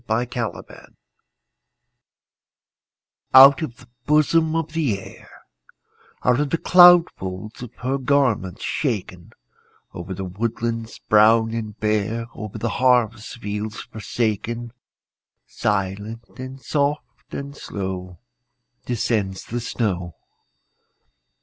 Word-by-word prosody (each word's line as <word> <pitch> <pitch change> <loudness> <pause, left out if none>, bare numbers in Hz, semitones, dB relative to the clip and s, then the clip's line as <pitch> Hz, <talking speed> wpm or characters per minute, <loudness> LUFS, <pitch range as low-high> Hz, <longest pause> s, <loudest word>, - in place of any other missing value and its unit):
SNOW 110 +3 +1
FLAKES 120 -2 -6 2.4
Out 135 +3 +9
of 125 -6 -5
the 130 -3 -17 0.2
bosom 155 +2 +3
of 165 -1 -2
the 140 -12 0
Air, - - -13 0.9
Out 125 +1 +3
of 145 -1 0
the 165 - 0
cloud 175 -1 +7
folds 95 +4 -7
of 125 -3 -7
her 130 +2 -1
garments 130 -9 +1
shaken, 95 - -3 0.6
Over 90 +2 -6
the 95 +1 -5
woodlands 115 +3 -3
brown 110 +1 +4
and 110 -2 -5
bare, 110 +2 0
Over 105 -2 -7
the 115 - -2
harvest 120 -3 +2
fields 105 0 -4
forsaken, 115 +2 -3 0.7
Silent, 105 +3 -2 0.2
and 130 +1 -7
soft, 145 +2 -2
and 140 0 -6
slow 95 -6 -6 0.7
Descends 105 -5 -1
the 120 - -4
snow. 90 -8 -2
115 Hz, 105 wpm, -22 LUFS, 105-130 Hz, 2.4 s, Out